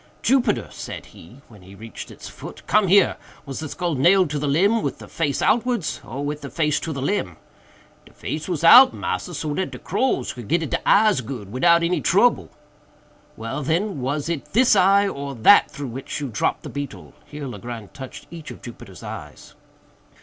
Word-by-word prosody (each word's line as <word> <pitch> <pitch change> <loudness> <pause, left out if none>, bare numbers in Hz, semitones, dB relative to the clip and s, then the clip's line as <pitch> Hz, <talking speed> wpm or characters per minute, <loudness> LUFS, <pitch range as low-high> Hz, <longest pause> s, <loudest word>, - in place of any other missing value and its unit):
"Jupiter," 250 -4 +2
said - - -8
he, 120 +11 -16
when 105 -4 -16
we 95 +2 -14
reached 110 +3 -9
its - - -11
foot, - - -11
"come 210 -1 +3
here! 195 +2 +4 0.3
was 135 -2 -6
the 155 -1 -5
skull 175 0 -2
nailed 175 +4 +4
to 150 - -2
the 145 - -2
limb 200 +11 +3
with - - -3
the - - -12
face 150 -4 -2
outwards, 240 -6 0
or 140 +4 -5
with 150 +1 -4
the 140 - -7
face 150 -3 0
to 165 - -5
the 135 -3 -4
limb?" 135 - -2 0.7
"De - - -18
face 155 0 -5
was 170 -3 -2
out, 250 +10 +9
massa, 175 - -4
so 150 0 -3
dat 190 +4 -2
de - - -9
crows 250 - -1
could 120 -4 -9
get 165 +3 +1
at 155 - -5
de - - -1
eyes 210 -8 +4
good, 115 -5 -8
widout 170 +7 +4
any 170 -2 0
trouble." - - +3 0.9
"Well, 115 +6 -4
then, 165 +3 -1
was 140 +4 -2
it 165 -4 -4
this 235 0 +5
eye 200 +1 +4
or 140 -6 -5
that 160 - +6
through 145 -4 -7
which 130 +4 -6
you 140 -2 -4
dropped 110 - -1
the - - -7
beetle?"—here 145 +1 -8
Legrand 115 -2 -8
touched 130 -2 -9
each 165 -3 -9
of - - -11
Jupiter's 115 -5 -11
eyes. - - -9
150 Hz, 195 wpm, -22 LUFS, 130-185 Hz, 0.9 s, out